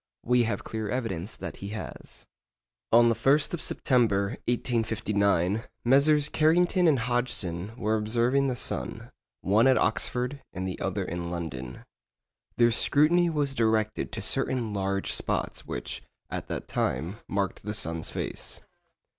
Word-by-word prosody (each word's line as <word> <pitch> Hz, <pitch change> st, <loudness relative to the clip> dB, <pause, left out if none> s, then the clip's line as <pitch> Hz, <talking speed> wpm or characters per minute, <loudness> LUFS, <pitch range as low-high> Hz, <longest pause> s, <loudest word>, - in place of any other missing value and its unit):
We 125 Hz, -1 st, +3 dB
have 115 Hz, -, -2 dB
clear 110 Hz, -2 st, -4 dB
evidence 105 Hz, -6 st, -3 dB
that -, -, -7 dB
he 100 Hz, -, -7 dB
has. -, -, -9 dB, 0.7 s
On 120 Hz, +1 st, +7 dB
the -, -, +4 dB
1st 140 Hz, +7 st, +2 dB
of 170 Hz, -, -2 dB
September, 105 Hz, -6 st, +2 dB, 0.2 s
1859, 110 Hz, -4 st, +1 dB, 0.2 s
Messrs. 145 Hz, +3 st, +5 dB
Carrington 175 Hz, +3 st, +3 dB
and 150 Hz, -4 st, +5 dB
Hodgson 115 Hz, -5 st, -2 dB
were 110 Hz, -1 st, +1 dB
observing 120 Hz, +6 st, +2 dB
the 130 Hz, -, -1 dB
sun, -, -, -4 dB, 0.3 s
one 105 Hz, +6 st, +4 dB
at 130 Hz, -, +5 dB
Oxford 125 Hz, +4 st, 0 dB
and 95 Hz, 0 st, -3 dB
the 95 Hz, -, -5 dB
other -, -, -1 dB
in 85 Hz, 0 st, -4 dB
London. 65 Hz, -8 st, -5 dB, 0.7 s
Their 120 Hz, 0 st, +5 dB
scrutiny 160 Hz, +8 st, +4 dB
was 145 Hz, -4 st, 0 dB
directed 110 Hz, -3 st, +1 dB
to -, -, -3 dB
certain 120 Hz, -5 st, 0 dB
large 100 Hz, 0 st, -1 dB
spots -, -, -2 dB
which, -, -, -4 dB, 0.3 s
at -, -, -4 dB
that -, -, -5 dB
time, 80 Hz, -, -1 dB
marked 100 Hz, -1 st, -2 dB
the 105 Hz, +1 st, -4 dB
sun's 80 Hz, -6 st, -3 dB
face. -, -, -5 dB
115 Hz, 140 wpm, -28 LUFS, 100-130 Hz, 0.7 s, On